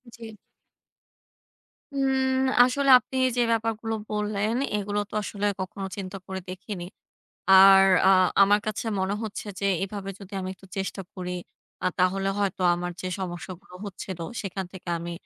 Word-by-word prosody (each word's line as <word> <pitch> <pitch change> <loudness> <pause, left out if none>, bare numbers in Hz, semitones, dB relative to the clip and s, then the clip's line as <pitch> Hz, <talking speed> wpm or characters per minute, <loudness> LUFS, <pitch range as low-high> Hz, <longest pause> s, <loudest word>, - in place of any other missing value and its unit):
জ্বী। 225 -1 -10 1.6
উম 265 -1 +1 0.2
আসলে 275 +3 +1
আপনি 260 - -7 0.2
যে - - +4
ব্যাপারগুলো 225 0 -1 0.2
বললেন 210 +1 -1 0.2
এগুলো 205 0 -2
তো - - -16
আসলে 205 0 -3
কখনো 195 +1 -5
চিন্তা 195 0 -5
করে 190 0 -4
দেখিনি। 185 -1 -6 0.7
আর 195 0 +9 0.2
আ - - +7 0.3
আমার 205 +1 +5
কাছে 215 +2 -3
মনে 190 +2 0
হচ্ছে 220 -1 -5
যে 200 - 0 0.2
এভাবে 195 0 -6
যদি 200 0 -12
আমি 185 - -4
একটু 190 - -18
চেষ্টা 195 0 -3
করি 180 -1 -5 0.5
আ - - +3
তাহলে 190 +2 +2
হয়তো 195 -2 -1
আমার 175 0 -3
যে 185 - -3
সমস্যাগুলো 180 0 -7
হচ্ছিল 190 -2 -7 0.2
সেখান 195 -1 -4
থেকে 185 -2 -11
আমি 170 +1 -5
195 Hz, 145 wpm, -26 LUFS, 190-215 Hz, 1.6 s, আর